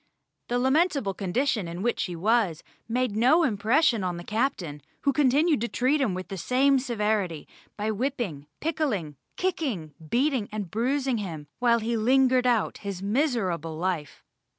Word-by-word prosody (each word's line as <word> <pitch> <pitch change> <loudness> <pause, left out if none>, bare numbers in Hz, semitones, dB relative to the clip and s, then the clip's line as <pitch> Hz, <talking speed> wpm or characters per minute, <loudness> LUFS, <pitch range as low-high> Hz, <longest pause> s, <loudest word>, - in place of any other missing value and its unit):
The 245 - 0
lamentable 265 - +2
condition 205 +2 -1
in 170 +3 -5
which 240 0 0
he 180 -3 -5
was 200 -2 +1 0.3
made 245 -2 0
no 260 +10 +4
impression 230 0 +2
on 180 -2 -2
the 175 - -7
captain, 205 - -2 0.2
who 280 - +2
continued 290 +1 +3
to 235 - 0
treat 265 +5 +1
him 215 -9 +1
with 185 0 -6
the 195 - -5
same 270 +7 +3
severity, 210 - -1 0.3
by 215 +1 -1
whipping, 215 - -3
pickling, 255 - -1 0.2
kicking, 260 - -2 0.2
beating, 255 -3 +1
and 205 -5 -5
bruising 255 +2 0
him 165 -7 -5
while 240 -1 +4
he 230 +1 -1
lingered 255 +2 +3
out 235 -4 +1
his 195 -2 -5
miserable 200 - 0
life. 165 -5 -3
230 Hz, 150 wpm, -26 LUFS, 185-265 Hz, 0.3 s, no